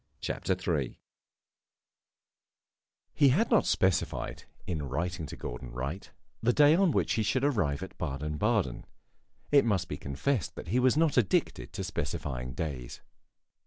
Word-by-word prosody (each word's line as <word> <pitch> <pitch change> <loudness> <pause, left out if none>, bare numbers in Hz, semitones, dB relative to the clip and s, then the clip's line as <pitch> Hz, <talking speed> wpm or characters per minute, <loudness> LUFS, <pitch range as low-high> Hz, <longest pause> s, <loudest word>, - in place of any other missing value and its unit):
CHAPTER 95 - -1 0.2
III 70 -4 -3 2.1
He 145 -2 +5
had 210 - +2
not 225 - +4
specified, 95 -2 0 0.2
in 75 -6 -3
writing 85 +3 -2
to - - -7
Gordon - - -6
Wright, 70 +9 -5 0.3
the 115 - +3
day 150 +2 +6
on 190 +2 +4
which - - +1
he 110 - +1
should 130 +5 +1
arrive 95 - +1
at 95 - -10
Baden 75 -1 -3
Baden; - - 0 0.6
it 145 -1 +6
must 95 -6 +1
be 75 - -4
confessed 75 - -2
that - - -8
he 120 +6 +2
was 130 +2 +4
not 160 -4 +3
addicted 110 -7 +1
to - - -3
specifying 65 -2 -3
days. 65 -4 -5
90 Hz, 145 wpm, -30 LUFS, -, 2.1 s, day